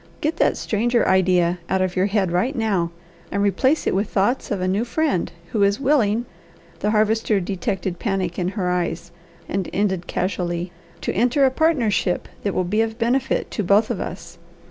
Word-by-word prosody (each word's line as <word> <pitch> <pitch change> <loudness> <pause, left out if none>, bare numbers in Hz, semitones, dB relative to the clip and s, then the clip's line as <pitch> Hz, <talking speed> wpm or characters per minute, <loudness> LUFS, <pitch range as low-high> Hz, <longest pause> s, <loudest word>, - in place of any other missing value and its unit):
Get 310 +2 -1
that - - +2
stranger 235 +3 +1
idea 180 -2 +3
out 190 0 +2
of 185 -1 -2
your 185 +1 +2
head 195 -3 0
right 225 +11 0
now, 200 -7 0 0.4
and 200 +1 0
replace 260 - +2
it - - +1
with 195 +3 0
thoughts 210 +7 0
of 200 - -1
a 185 - -1
new 195 +4 +1
friend, 265 - 0 0.2
who 215 - 0
is 200 0 +3
willing" 240 -5 +2 0.5
the 210 - 0
Harvester 215 0 +2
detected 190 -1 -3
panic 190 -5 -2
in 180 - 0
her 180 -2 0
eyes 175 -1 -2 0.4
and 190 -2 -2
ended 190 -3 -1
casually 175 -1 -2 0.3
"to - - -2
enter 250 +6 +3
a 260 - +3
partnership 255 - +1
that 200 - -2
will 185 - +2
be 210 +5 +1
of 225 0 -2
benefit 245 +2 0
to 210 - -2
both 200 +4 +3
of - - -3
us. 170 -1 -7
200 Hz, 185 wpm, -22 LUFS, 185-230 Hz, 0.5 s, idea